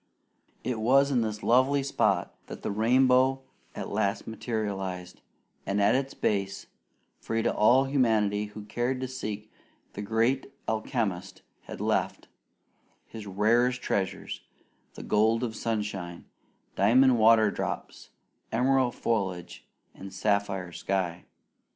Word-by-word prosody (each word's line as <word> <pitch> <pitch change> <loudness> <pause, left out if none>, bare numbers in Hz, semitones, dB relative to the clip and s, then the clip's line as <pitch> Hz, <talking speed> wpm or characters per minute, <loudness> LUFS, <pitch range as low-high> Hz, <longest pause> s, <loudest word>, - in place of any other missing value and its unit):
It 125 -3 -2
was 135 +5 +4
in 125 -3 +2
this 110 -1 -3
lovely 130 +3 +3
spot 135 - 0
that - - -9
the - - -2
rainbow 130 +4 +3 0.3
at - - -5
last 100 0 -1
materialized, 100 -6 -4 0.4
and 100 +1 -1
at 100 +2 +4
its 135 +1 -1
base, 100 -1 -1 0.5
free 115 0 -2
to - - +1
all 125 +5 +5
humanity 110 -6 +1
who 105 0 -9
cared 120 +4 -2
to 130 - -2
seek, 110 -5 -6 0.4
the 100 - -6
Great 115 +6 0 0.2
Alchemist 110 -4 -2 0.2
had - - -8
left - - -1 0.8
His 110 -2 -9
rarest 120 +6 +2
treasures 95 -2 -2 0.5
the - - -8
gold 110 +3 +2
of 115 -3 -3
sunshine, 105 -7 -4 0.5
diamond 125 +4 +4
water 110 -1 +5
drops, - - -5 0.4
emerald 130 -1 +2
foliage, 95 -6 -3 0.3
and 95 0 -10
sapphire 95 -2 -1
sky. 90 -1 -2
110 Hz, 120 wpm, -28 LUFS, 100-125 Hz, 0.8 s, all